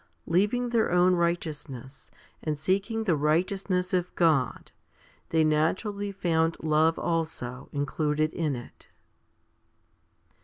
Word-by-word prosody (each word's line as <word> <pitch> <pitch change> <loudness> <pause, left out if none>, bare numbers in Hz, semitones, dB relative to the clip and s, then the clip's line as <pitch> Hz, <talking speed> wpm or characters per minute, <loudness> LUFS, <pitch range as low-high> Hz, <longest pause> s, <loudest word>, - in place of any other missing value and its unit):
Leaving 210 +8 +1
their 230 -2 +2
own 180 +1 +4
righteousness, 150 -6 -3 0.3
and 155 -2 -2
seeking 200 +8 0
the 180 -7 +2
righteousness 180 +5 0
of 180 -1 0
God, 155 -8 +1 0.6
they 160 -1 +3
naturally 190 +7 0
found 165 -4 0
love 160 +1 +3
also 155 -6 -3
included 150 +2 0
in 155 -5 -1
it. 120 - -11
165 Hz, 105 wpm, -27 LUFS, 150-185 Hz, 0.6 s, own